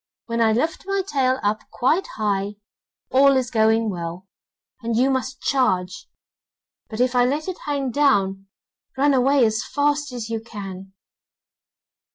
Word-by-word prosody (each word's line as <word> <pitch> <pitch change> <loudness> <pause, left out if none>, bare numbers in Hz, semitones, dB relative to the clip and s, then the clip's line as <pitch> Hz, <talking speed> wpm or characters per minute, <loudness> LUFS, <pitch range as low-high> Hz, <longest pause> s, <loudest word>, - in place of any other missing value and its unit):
When 230 0 -2
I 225 -1 +4
lift 315 - -1
my 395 0 0
tail 265 -6 +1
up 210 +1 0
quite 315 +10 +1
high, 205 -1 -1 0.6
all 275 +1 +5
is 250 -2 -1
going 220 -1 +2
well, 175 +1 -6 0.5
and 230 -1 -1
you 260 +3 +3
must 260 0 -3
charge; 250 - 0 0.8
but 220 - -7
if 250 +1 +2
I 245 - +5
let 290 +6 -1
it 370 - -4
hang 280 -3 -1
down, 195 -9 +1 0.5
run 285 +1 +3
away 265 0 +4
as 220 0 0
fast 290 0 0
as 240 -3 -5
you 225 0 -3
can. 195 -4 -9
245 Hz, 150 wpm, -22 LUFS, 215-275 Hz, 0.8 s, all